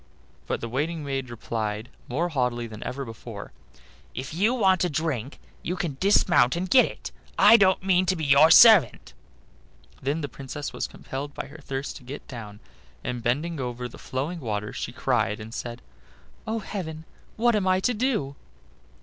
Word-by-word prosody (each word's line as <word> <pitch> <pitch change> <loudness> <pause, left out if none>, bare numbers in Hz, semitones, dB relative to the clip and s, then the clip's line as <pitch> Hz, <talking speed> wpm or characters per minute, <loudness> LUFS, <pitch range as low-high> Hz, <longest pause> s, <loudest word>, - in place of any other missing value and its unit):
But - - -2
the 115 - -3
waiting 150 +6 -2
maid 135 -2 -3
replied, 110 -1 -4 0.2
more 165 +8 -1
haughtily 125 -5 -1
even 110 -2 -9
than 135 +4 -5
before: 115 -2 -9 0.6
"If 130 +4 -5
you 210 +9 +2
want 190 -6 +3
a 180 - +1
drink, 145 -5 -3 0.2
you 180 - -3
can 165 -7 -3
dismount 180 -9 +4
and 180 +2 -2
get 255 +6 +6
it; - - -7 0.3
I - - +8
don't 190 -4 +4
mean 185 -1 +3
to 185 - +2
be 160 -3 -3
your 145 +3 +6
servant." 215 - +7 0.9
Then 145 +5 -1
the 145 - -2
Princess 140 +1 -7
was - - -3
compelled 140 +2 -7
by - - -4
her 145 +3 -12
thirst 135 -1 -5
to - - -15
get 135 +4 -8
down, 110 -4 -9 0.4
and 125 -1 -3
bending 145 +7 -1
over 125 -1 -4
the 120 - -13
flowing 145 +7 -4
water 105 -5 -3
she - - -4
cried 115 -4 0
and 110 +1 -9
said: 120 0 -6 0.6
"Oh! 220 +1 -1
heaven, 160 -7 -6 0.3
what 235 +1 +3
am 200 -3 0
I 185 0 +3
to 245 - +1
do?" 215 - -1
140 Hz, 175 wpm, -26 LUFS, 120-180 Hz, 0.9 s, I